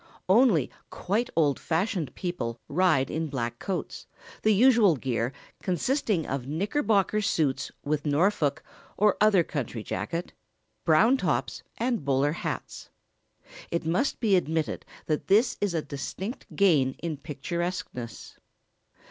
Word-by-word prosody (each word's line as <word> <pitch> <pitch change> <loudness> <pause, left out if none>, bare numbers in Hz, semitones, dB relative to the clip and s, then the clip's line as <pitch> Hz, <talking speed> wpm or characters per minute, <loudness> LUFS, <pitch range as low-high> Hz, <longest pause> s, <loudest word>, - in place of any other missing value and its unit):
] - - -27
Only 195 - +4 0.2
quite 220 +7 -1
old 150 -4 +2
fashioned 170 - -1
people 120 -11 -4
ride 155 -5 +2
in 160 +1 -2
black 120 -4 -3
coats, 190 -3 -4 0.3
the 215 - +3
usual 220 -4 +5
gear 120 -2 -1 0.3
consisting 190 - 0
of 135 -2 -3
knickerbocker 205 - +1
suits 145 -8 0
with 150 0 -1
Norfolk, 155 -1 +1 0.3
or 210 0 +4
other 205 -5 +5
country 125 -8 -4
jacket, 170 +9 -4 0.5
brown 220 +12 +5
tops - - -1 0.2
and 235 - -1
bowler 140 +1 +2
hats. 165 - -5 0.8
It 170 -1 -2
must 180 - 0
be 215 -5 +3
admitted 160 -3 -1 0.2
that 155 -1 -2
this 230 +5 +4
is 200 -4 0
a 160 - 0
distinct 185 - -6
gain 150 -10 +4
in 165 0 -5
picturesqueness. 150 - -5
170 Hz, 125 wpm, -27 LUFS, 145-205 Hz, 0.8 s, usual